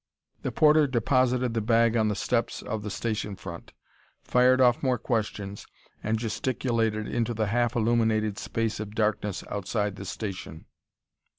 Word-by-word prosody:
The - - -2
porter 155 -1 +5
deposited 125 0 +1
the 115 - 0
bag 115 +1 +3
on 110 -2 +3
the 105 - 0
steps 115 +3 -1
of 110 -3 -3
the 105 - -5
station 105 -1 -3
front, 85 -3 -9 0.5
fired 125 +1 +4
off 125 -2 +4
more 130 -3 +1
questions 105 -4 -3 0.3
and 110 +1 0
gesticulated 115 -1 -1
into 120 0 -1
the 110 0 0
half 120 +3 0
illuminated 110 -2 +1
space 115 -1 -2
of 105 0 -6
darkness 105 -3 0
outside 105 0 -2
the 100 - -7
station. 95 -5 -6
110 Hz, 150 wpm, -27 LUFS, 105-120 Hz, 0.5 s, porter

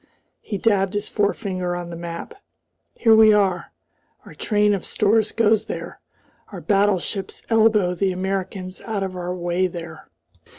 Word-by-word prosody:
He 205 - -4
dabbed 195 -1 +1
his 205 0 -2
forefinger 190 -4 -1
on 175 -1 -6
the - - -6
map. 170 0 -7 0.6
"Here 225 -2 +5
we 220 -1 +7
are. 195 -3 +1 0.5
Our - - -12
train 210 -1 +1
of 195 - -2
stores 215 +1 +1
goes 220 -1 +2
there, - - -6 0.5
our - - -7
battleships 200 -1 0
elbow 215 -5 +4
the 190 +2 0
Americans 185 0 -4
out 215 -4 -3
of 190 -1 -4
our 180 0 -4
way 175 +1 0
there." 170 -2 -9
195 Hz, 145 wpm, -22 LUFS, 180-210 Hz, 0.6 s, we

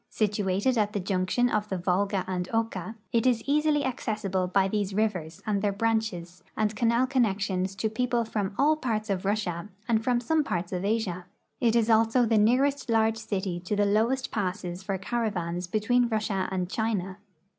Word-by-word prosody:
Situated 210 +3 0
at 210 0 +1
the 205 - -1
junction 190 +5 +1
of 210 -3 -1
the 190 - -1
Volga 190 +2 0
and 180 -1 -3
Oka, 225 -3 -2 0.2
it 230 +1 +3
is 240 -3 +2
easily 295 0 +2
accessible 205 -7 -1
by 190 +1 +2
these 200 -1 -2
rivers 180 -7 -1
and 205 -3 0
their 205 0 +1
branches 200 -5 -2
and 215 -1 0
canal 235 +3 +2
connections 200 -7 0
to 220 - -1
people 240 +1 0
from 205 -3 -3
all 300 +3 +4
parts 220 -7 -2
of 190 -1 -2
Russia 200 -3 -1 0.2
and 225 -2 +2
from 245 0 +2
some 310 +6 +1
parts 175 -10 -3
of 180 -1 -2
Asia. 200 -4 -1 0.3
It 235 -3 +2
is 230 -2 +3
also 225 +2 +4
the 225 -1 +3
nearest 260 +5 +2
large 225 -1 +3
city 195 -5 -3
to 180 +4 -3
the 205 0 +2
lowest 230 +6 +1
passes 185 -3 -3
for 195 0 -2
caraA^ans 180 -5 -2
between 240 +3 +2
Russia 215 -4 -1
and 185 -1 -1
China. 200 -2 -2
210 Hz, 175 wpm, -27 LUFS, 190-230 Hz, 0.3 s, all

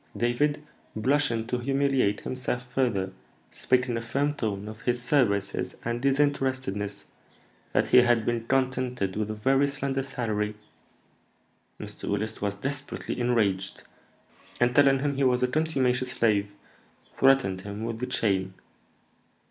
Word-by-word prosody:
David, 145 +5 +1 0.3
blushing 120 -1 +1
to 125 +1 -2
humiliate 135 -4 +1
himself 130 -1 -3
further, 110 -7 0 0.4
spake 130 0 +1
in 120 - -1
a - - -3
firm 140 +6 0
tone 105 -7 -3
of 110 +1 -9
his 120 0 0
services 120 -6 +1
and 120 +1 -2
disinterestedness, 130 -7 0 0.7
that - - +1
he - - +6
had 120 -2 +5
been 115 -1 -1
contented 130 -6 0
with 105 0 -2
a 110 - -3
very 135 +6 +2
slender 140 -1 -2
salary. 110 -6 -2 1.2
Mr. - - -7
Willis 105 +2 -2
was 100 -1 -1
desperately 140 +4 -4
enraged, 105 -6 0 0.8
and, 120 0 +3
telling 140 -2 +5
him 140 -1 -1
he 140 - +1
was 125 -1 +3
a - - +4
contumacious 130 -4 0
slave, 100 -3 +1 0.6
threatened 135 -9 +3
him 100 +2 -6
with 115 0 -4
the 125 - -3
chain. 95 -3 0
125 Hz, 135 wpm, -27 LUFS, 105-135 Hz, 1.2 s, he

